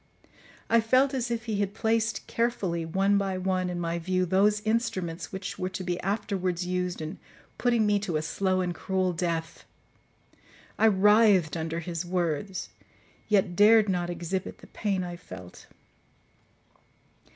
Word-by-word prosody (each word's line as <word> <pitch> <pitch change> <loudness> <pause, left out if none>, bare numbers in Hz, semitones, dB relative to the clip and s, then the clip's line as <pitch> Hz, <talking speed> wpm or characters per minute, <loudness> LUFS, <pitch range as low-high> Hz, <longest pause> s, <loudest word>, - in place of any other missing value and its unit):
I 230 0 +4
felt 255 +5 +3
as 250 -2 -1
if 230 -1 -3
he 215 -3 -2
had 200 0 -1
placed 225 -1 0
carefully, 195 -8 -1
one 195 +4 +2
by 195 -1 -1
one, 185 -1 0
in 175 -1 -3
my 170 0 -2
view 185 +2 0
those 200 +4 +3
instruments 185 -8 -2
which 190 0 -6
were 185 - -1
to 190 0 -5
be 180 -1 -2
afterwards 190 -3 -2
used 180 -2 -2
in 155 +5 -6 0.4
putting 235 -3 +2
me 205 -1 +3
to 185 -6 -2
a 155 - -2
slow 185 +2 0
and 180 -1 -1
cruel 185 0 -1
death. 165 -1 -3 1.2
I 220 - +6
writhed 205 -5 +4
under 165 +1 -3
his 170 0 -4
words, 175 +1 -2 0.6
yet 195 -4 +2
dared 215 +1 +6
not 175 -2 0
exhibit 175 +2 -4
the - - -15
pain 195 -4 -1
I 175 -1 -6
felt. 90 - -12
185 Hz, 150 wpm, -27 LUFS, 175-210 Hz, 1.2 s, I